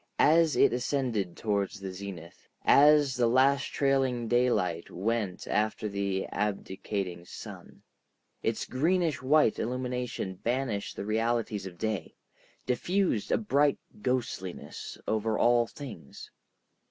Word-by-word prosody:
As 160 0 +5
it - - +5
ascended 125 -7 -1
toward 100 -3 0
the 95 -2 -6
zenith, 95 -3 -9 0.2
as 145 -2 +6
the 120 -1 +3
last 135 +3 +4
trailing 135 -4 +1
daylight 105 -9 +1
went 105 -1 -2
after 110 0 0
the 100 -1 -2
abdicating 100 -3 -3
sun, - - -11 0.6
its 115 0 -1
greenish 160 +2 +1
white 135 -3 +3
illumination 125 -5 -3
banished 120 -4 -2
the - - -5
realities 110 -2 -1
of 90 -2 -11
day, 110 -6 -3 0.5
diffused 175 - 0
a - - +4
bright 145 -9 +2 0.2
ghostliness 120 -8 -3
over 110 0 0
all 120 -1 +4
things. 115 - -10
115 Hz, 115 wpm, -29 LUFS, 100-130 Hz, 0.6 s, as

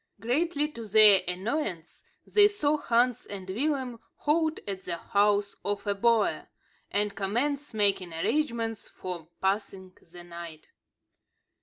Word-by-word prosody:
Greatly 295 - 0
to 230 -7 -9
their 210 -2 +8
annoyance, 185 - -3 0.2
they 410 -1 +5
saw 305 -8 0
Hans 245 -4 +1
and 195 -2 -8
Willem 255 +3 -2 0.2
halt 315 +1 0
at 195 -2 -4
the 170 - -4
house 205 +2 +1
of 200 0 -3
a 205 - +1
boer, 225 +1 +1 0.4
and 205 0 -1
commence 265 +9 -2
making 200 -4 +2
arrangements 230 - -2
for 175 -4 -8
passing 190 -1 -3 0.2
the 175 0 -11
night. 170 -2 -10
210 Hz, 125 wpm, -27 LUFS, 190-270 Hz, 0.4 s, their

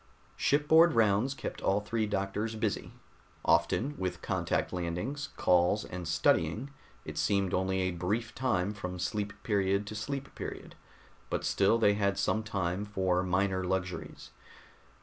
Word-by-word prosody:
Shipboard 160 +3 +5
rounds 115 +3 +3
kept - - -6
all 95 +2 +2
three 110 +1 -1
doctors 105 +2 -2
busy. 110 -2 -2 0.5
Often, 140 +4 +2
with 90 -2 -3
contact - - -1
landings, 90 - -3
calls, 90 +4 +3
and 90 -2 -6
studying, 115 +10 +1 0.3
it - - -5
seemed 100 -2 +1
only 95 0 +1
a 95 0 0
brief 105 +7 -2
time 105 -7 0
from 90 -3 -5
sleep 105 +3 -2
period 100 -1 +1
to 105 - -6
sleep 135 +6 -4
period, - - -7 0.6
but - - -2
still 100 +3 +3
they 105 -3 +4
had 100 -1 0
some 110 - +1
time 95 -3 -2
for 95 -3 0
minor 95 +1 +1
luxuries. 90 0 -4
100 Hz, 140 wpm, -31 LUFS, 95-110 Hz, 0.6 s, Shipboard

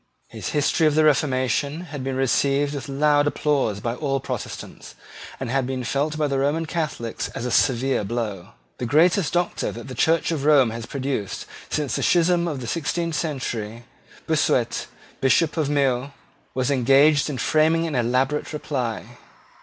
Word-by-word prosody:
His - - -7
History 150 +2 +2
of 150 - +1
the 155 - +4
Reformation 140 +1 +1
had 145 -6 -7
been 135 0 -2
received 140 +2 +1
with 140 0 -6
loud 145 +1 +3
applause 140 -9 0
by 115 +1 -2
all 135 +1 -1
Protestants, - - -7 0.4
and 130 -3 -4
had 135 -1 0
been 130 -1 -3
felt 145 +5 -1
by 155 - +1
the 140 -2 0
Roman 145 +4 0
Catholics 150 -8 -3
as 115 - -4
a 125 - -2
severe 130 -1 +2
blow. 105 -4 -3 0.3
The 125 - -2
greatest 165 - +3
Doctor 175 0 0
that 120 - -9
the 130 - -7
Church 165 +7 +2
of 155 -4 -2
Rome 140 -6 +5
has 115 0 -6
produced 135 -7 -3 0.2
since 150 -3 -1
the - - -1
schism 175 0 +3
of 145 -5 -3
the - - -5
sixteenth 170 +3 -2
century, 120 -8 -3 0.4
Bossuet, 140 -6 +1 0.3
Bishop 150 +4 +3
of 155 -4 0
Meaux, 135 -2 +1 0.4
was 130 +1 0
engaged 140 +3 +4
in 140 - -3
framing 160 +4 +2
an 160 - -3
elaborate 130 +5 0
reply. 125 -5 -4
140 Hz, 165 wpm, -23 LUFS, 125-155 Hz, 0.4 s, Rome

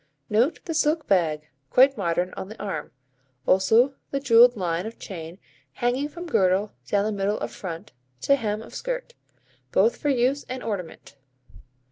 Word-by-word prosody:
Note 235 +9 +2
the 330 - -3
silk 310 +1 +1
bag, 155 -6 +1 0.2
quite 270 - +5
modern, 175 -1 -1
on 190 - -6
the 220 - -11
arm; 190 -7 -4 0.5
also 225 +8 +4 0.2
the 275 - -1
jewelled 245 -2 +6
line 175 +1 -1
of 225 - -9
chain 170 -3 -8 0.4
hanging 250 - -1
from 345 +3 -8
girdle 195 - +2 0.2
down 200 +6 +1
the 215 - 0
middle 205 +1 -1
of - - -4
front, 170 -3 -7 0.3
to 280 - +3
hem 215 -4 -3
of - - -13
skirt, - - -4 0.6
both 470 - +3
for 295 - -1
use 265 +2 +1
and 255 0 -5
ornament. 180 -8 -6
220 Hz, 160 wpm, -25 LUFS, 185-275 Hz, 0.6 s, jewelled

